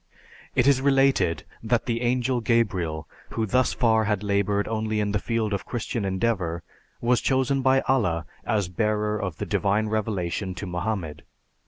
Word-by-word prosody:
"It 125 - +3
is 135 -1 +4
related 135 -10 +3 0.2
that 115 +1 0
the 115 -1 -1
Angel 125 0 +1
Gabriel, 95 -10 0 0.2
who 115 - -1
thus 125 +4 +2
far 110 -3 +2
had 105 -1 0
labored 100 0 +1
only 110 -1 -1
in 105 -1 0
the 105 - +1
field 110 -1 -1
of 100 -3 -3
Christian 115 -3 -3
endeavor, 95 -4 -1 0.4
was 120 +1 +2
chosen 135 +1 +1
by 135 +1 +4
Allah 95 -11 +1 0.2
as 105 -4 0
bearer 105 +2 0
of 95 -5 -3
the - - -3
divine 105 +2 +1
revelation 100 -3 -2
to 100 - -5
Mohammed. 90 -3 -3
110 Hz, 160 wpm, -25 LUFS, 95-120 Hz, 0.4 s, is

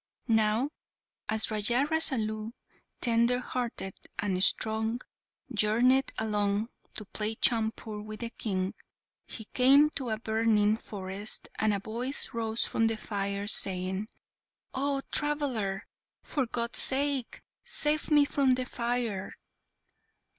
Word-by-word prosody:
Now, 220 +4 +2 0.6
as 220 +1 +1
Raja 235 +6 +2
Rasalu, 230 -9 +1 0.5
tender 235 +1 +3
hearted 240 -6 -4 0.2
and 185 0 0
strong, 220 +2 +2 0.5
journeyed 235 +5 +3
along 210 0 0 0.3
to 215 - -5
play 215 +2 -2
chaupur 220 -2 +1
with 215 +1 -8
the 230 -1 -3
King, 190 -5 -2 0.5
he 220 - -8
came 275 +6 +5
to 265 -5 -3
a 220 - -1
burning 220 -1 +2
forest, 200 0 -4
and 215 0 +3
a 200 - 0
voice 240 +7 -2
rose 225 -1 -1
from 225 - +1
the 225 -1 -1
fire 200 -1 -3
saying, 190 0 +1 0.7
"Oh, 275 0 0
traveller! 265 -10 0 0.4
for 270 -5 -1
God's 235 0 -1
sake 275 -2 0 0.2
save 300 +1 0
me 295 -2 +5
from 275 -3 +2
the 255 0 -3
fire!" 235 -5 -2
225 Hz, 120 wpm, -29 LUFS, 210-255 Hz, 0.7 s, came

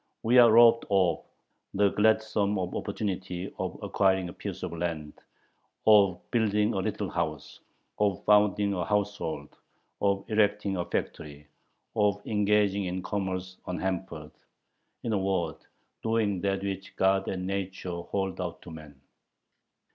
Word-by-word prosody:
We 120 +3 +5
are 120 -2 +8
robbed 115 +1 +6
of 95 -5 +2 0.5
the 100 0 +4
gladsome 110 -1 +2
opportunity 95 0 -4
of - - -3
acquiring 95 -2 +1
a - - -9
piece - - -7
of - - -4
land, 80 -3 -4 0.7
of 100 -4 +5
building 105 -2 +2
a 95 - -1
little 95 - -2
house, 75 -2 -4 0.4
of 100 -3 0
founding 105 -1 +4
a 90 -2 -1
household, 100 -7 -2 0.5
of 100 -1 +1
erecting 105 -2 +1
a 85 -1 -2
factory, 75 0 -5 0.5
of 105 -1 +2
engaging 105 -2 +2
in 90 0 -3
commerce 95 -2 -3
unhampered, 90 -4 -4 0.7
in 115 - -1
a 100 - +1
word, 90 -4 -1 0.4
doing 110 -4 0
that 95 -1 -1
which 95 -1 -5
God 95 0 +2
and 90 -1 -3
nature 95 -2 -4
hold 95 0 -3
out 85 -2 -5
to 85 - -10
man. 75 -3 -12
95 Hz, 130 wpm, -28 LUFS, 90-105 Hz, 0.7 s, are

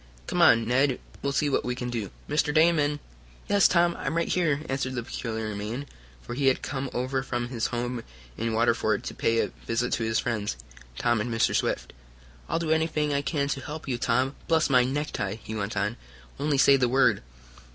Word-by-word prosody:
Come - - 0
on, 115 0 +6
Ned. 130 +2 +2 0.2
We'll 140 - 0
see 145 +2 +1
what 140 - +1
we 125 0 -2
can 125 -1 -4
do. 110 -5 -3 0.2
Mr. 150 0 +1
Damon 155 -2 +3 0.2
" - - -25
"Yes, 205 -1 +6
Tom, 170 -1 +3
I'm 150 +3 -2
right 170 - +1
here," 155 -5 +1
answered 135 -1 -2
the 120 - -2
peculiar 110 -3 -4
man, 110 +7 -4 0.4
for - - -6
he 135 +2 +1
had 130 - +2
come 135 -1 -3
over 130 +2 -1
from 120 -2 -3
his 120 -3 -1
home 120 0 -3 0.3
in 115 +1 -2
Waterford 115 -2 +1
to - - -5
pay 115 0 +1
a - - -1 0.2
visit 115 +2 0
to 115 - 0
his 110 0 +1
friends, 105 - -1 0.4
Tom 120 -3 +2
and 120 +2 -3
Mr. 115 -1 +2
Swift. - - -1 0.6
"I'll - - +1
do 165 -1 -1
anything 155 -2 +1
I 140 - +1
can 140 0 -1
to 135 - -2
help 155 +3 -7
you, 125 -3 -2
Tom, 130 +3 +1
bless 160 -3 +2
my 125 -1 +6
necktie!" 130 -7 -2
he 110 - -6
went 105 0 -3
on. 105 +3 -1 0.4
"Only 145 0 +1
say 135 +1 +6
the 125 -2 +2
word!" 135 +2 +3
130 Hz, 205 wpm, -27 LUFS, 115-145 Hz, 0.6 s, on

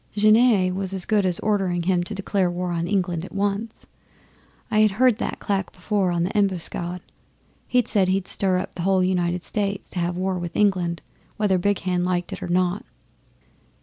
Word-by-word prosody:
Genet 215 -3 +4
was 195 0 -3
as 185 - -3
good 205 -3 +2
as 175 -2 +1
ordering 190 -5 0
him 180 0 +1
to 210 +4 -5
declare 195 -1 0
war 175 0 -3
on 170 0 -2
England 180 -4 -1
at 185 - -9
once. 205 +3 -2 0.9
I 215 - +3
had 215 0 +6
heard 250 -2 +4
that - - -3
clack 195 -2 -2
before 190 0 -1
on 170 -1 0
the 185 +5 -3
Embuscade. 180 -3 -1 0.7
He 250 0 +3
said 200 -5 +2
he'd 190 0 0
stir 190 -2 +1
up 185 - -4
the 175 - -6
whole 190 +1 +2
United 180 -1 0
States 200 -2 -3
to 180 - -3
have 175 0 -1
war 185 0 -1
with 175 -1 -6
England, 180 -5 +1 0.3
whether 200 -3 +2
Big 200 +1 0
Hand 180 -1 0
liked 180 -1 -1
it - - -7
or - - -4
not. 180 +2 0
185 Hz, 190 wpm, -23 LUFS, 180-205 Hz, 0.9 s, had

